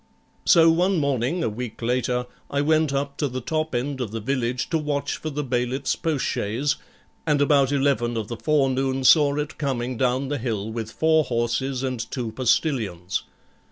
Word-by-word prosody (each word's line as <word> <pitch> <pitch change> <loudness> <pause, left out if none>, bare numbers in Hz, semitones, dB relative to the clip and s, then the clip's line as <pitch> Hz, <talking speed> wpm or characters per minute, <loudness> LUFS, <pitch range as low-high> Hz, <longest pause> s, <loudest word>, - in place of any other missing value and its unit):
So 165 -1 +7
one 180 +3 +2
morning, 140 +3 0
a - - +1
week 115 +1 -6
later, 125 +1 0 0.2
I 140 - 0
went 155 0 +2
up 140 +1 -2
to 145 - 0
the 130 -1 -4
top 155 +3 -2
end 130 +2 -2
of 120 - -2
the 115 +2 -4
village 125 +1 -1
to 165 - +2
watch 145 -2 -2
for 155 - -5
the 150 0 -3
bailiff's 125 +1 -1
postchaise, 140 -3 -1 0.5
and 150 -2 +3
about 140 -1 +4
eleven 135 -4 +1
of 110 -2 -3
the 115 - -5
forenoon 135 -2 +1
saw 145 +1 +6
it 150 +1 -4
coming 130 -4 -2
down 130 +2 +1
the 145 -1 -2
hill 110 -3 -3
with 110 -1 -4
four 160 +2 +3
horses 125 +2 -1
and 130 -2 -2
two 120 -4 -3
postillions. 110 - 0
135 Hz, 175 wpm, -24 LUFS, 120-145 Hz, 0.5 s, So